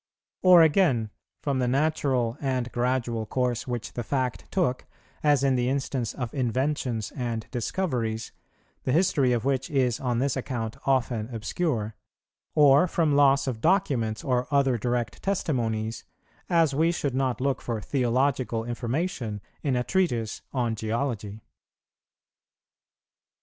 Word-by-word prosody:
Or, 180 Hz, -2 st, +8 dB
again, 145 Hz, -, +3 dB, 0.3 s
from 140 Hz, -3 st, 0 dB
the 125 Hz, -, +1 dB
natural 130 Hz, -4 st, +1 dB
and 130 Hz, -3 st, -1 dB
gradual 120 Hz, -2 st, -1 dB
course 125 Hz, -1 st, -1 dB
which 120 Hz, -3 st, -4 dB
the 120 Hz, -, -3 dB
fact 125 Hz, +1 st, -2 dB
took, 165 Hz, -10 st, 0 dB, 0.3 s
as 145 Hz, -3 st, +3 dB
in 135 Hz, -1 st, +3 dB
the 125 Hz, 0 st, +1 dB
instance 135 Hz, -3 st, -2 dB
of 125 Hz, -4 st, -4 dB
inventions 130 Hz, -3 st, -1 dB
and 120 Hz, -4 st, -3 dB
discoveries, 120 Hz, -, -2 dB, 0.5 s
the 130 Hz, -, 0 dB
history 150 Hz, -6 st, +3 dB
of 120 Hz, 0 st, 0 dB
which 135 Hz, -1 st, 0 dB
is 130 Hz, -5 st, +1 dB
on 125 Hz, -3 st, -1 dB
this 135 Hz, +2 st, +1 dB
account 120 Hz, -4 st, -3 dB
often 120 Hz, -4 st, +1 dB
obscure; 115 Hz, 0 st, -2 dB, 0.6 s
or 145 Hz, +2 st, +6 dB
from 160 Hz, -4 st, +1 dB
loss 140 Hz, -1 st, +5 dB
of 120 Hz, -5 st, -3 dB
documents 130 Hz, -, +1 dB
or 125 Hz, -1 st, 0 dB
other 140 Hz, -3 st, +3 dB
direct 120 Hz, +1 st, -2 dB
testimonies, 115 Hz, -, -1 dB, 0.5 s
as 165 Hz, -4 st, +3 dB
we 160 Hz, +4 st, +3 dB
should 145 Hz, -6 st, -2 dB
not 130 Hz, -3 st, 0 dB
look 135 Hz, +1 st, 0 dB
for 115 Hz, -2 st, -3 dB
theological 125 Hz, 0 st, 0 dB
information 120 Hz, -, -2 dB, 0.2 s
in 140 Hz, -3 st, 0 dB
a 125 Hz, -, +1 dB
treatise 120 Hz, -, 0 dB
on 120 Hz, -4 st, 0 dB
geology. 110 Hz, -1 st, -3 dB
125 Hz, 135 wpm, -26 LUFS, 115-140 Hz, 0.6 s, Or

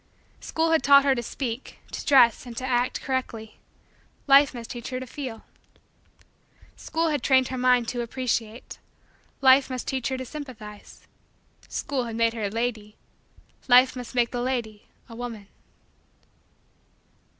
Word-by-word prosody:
School 325 Hz, 0 st, -1 dB
had 320 Hz, -, +3 dB
taught 280 Hz, +1 st, +6 dB
her 275 Hz, -, +4 dB
to 240 Hz, -, -2 dB
speak, 240 Hz, +1 st, -6 dB
to -, -, -5 dB
dress, 250 Hz, -4 st, +4 dB
and 235 Hz, -1 st, -9 dB
to 255 Hz, -, -3 dB
act 245 Hz, -1 st, 0 dB
correctly: 235 Hz, -5 st, -4 dB, 0.7 s
Life 280 Hz, 0 st, +6 dB
must 235 Hz, -2 st, -8 dB
teach 240 Hz, -1 st, -7 dB
her 255 Hz, -1 st, -3 dB
to 260 Hz, -, -7 dB
feel. 255 Hz, -3 st, -7 dB, 1.3 s
School 325 Hz, 0 st, -2 dB
had 295 Hz, -4 st, -1 dB
trained 260 Hz, -1 st, +3 dB
her 260 Hz, -, -4 dB
mind 250 Hz, -2 st, +3 dB
to 245 Hz, -, -3 dB
appreciate: 235 Hz, -1 st, -4 dB, 0.6 s
Life 265 Hz, 0 st, +6 dB
must 255 Hz, -1 st, -5 dB
teach 260 Hz, -3 st, -2 dB
her 265 Hz, -, -2 dB
to 260 Hz, -, -6 dB
sympathize. 240 Hz, -8 st, -10 dB, 0.6 s
School 260 Hz, -4 st, -3 dB
had 230 Hz, -1 st, -6 dB
made 230 Hz, 0 st, +2 dB
her 225 Hz, -3 st, -3 dB
a -, -, -1 dB
lady: 220 Hz, -1 st, -3 dB, 0.7 s
Life 250 Hz, +1 st, +6 dB
must 250 Hz, 0 st, -8 dB
make 240 Hz, -1 st, +2 dB
the 245 Hz, -, -3 dB
lady 235 Hz, -5 st, -3 dB, 0.2 s
a 230 Hz, -, -11 dB
woman. 230 Hz, -4 st, -7 dB
250 Hz, 150 wpm, -25 LUFS, 230-265 Hz, 1.3 s, taught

